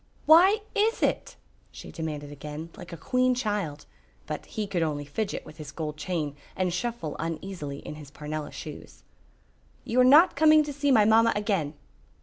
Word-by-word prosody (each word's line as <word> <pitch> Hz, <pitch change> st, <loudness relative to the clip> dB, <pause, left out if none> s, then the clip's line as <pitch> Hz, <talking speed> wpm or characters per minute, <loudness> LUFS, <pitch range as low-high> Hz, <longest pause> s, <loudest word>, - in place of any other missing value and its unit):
"Why 375 Hz, +7 st, +7 dB
is 440 Hz, +1 st, +1 dB
it?" -, -, 0 dB, 0.4 s
she -, -, -10 dB
demanded 150 Hz, -3 st, -5 dB
again, 150 Hz, +3 st, -8 dB
like 175 Hz, -, -11 dB
a 170 Hz, -, -7 dB
queen 255 Hz, +9 st, +1 dB
child, 205 Hz, -, -3 dB, 0.4 s
but -, -, -6 dB
he 215 Hz, -, -3 dB
could 190 Hz, -4 st, -2 dB
only 150 Hz, -3 st, -1 dB
fidget 195 Hz, +9 st, -3 dB
with 155 Hz, 0 st, -13 dB
his 155 Hz, -2 st, -8 dB
gold 155 Hz, -2 st, -5 dB
chain 150 Hz, -2 st, -3 dB, 0.2 s
and 185 Hz, -2 st, 0 dB
shuffle 230 Hz, -4 st, -3 dB
uneasily 165 Hz, -2 st, -5 dB
in -, -, -7 dB
his 145 Hz, -, -12 dB
parnella 150 Hz, +1 st, -6 dB
shoes. -, -, -10 dB, 0.8 s
"You 240 Hz, +3 st, 0 dB
are -, -, +7 dB
not 300 Hz, +8 st, +7 dB
coming 310 Hz, 0 st, +6 dB
to 295 Hz, -1 st, -5 dB
see 285 Hz, +1 st, 0 dB
my 220 Hz, -6 st, +5 dB
mamma 225 Hz, +1 st, +5 dB
again." 195 Hz, -8 st, -1 dB
180 Hz, 170 wpm, -27 LUFS, 150-250 Hz, 0.8 s, Why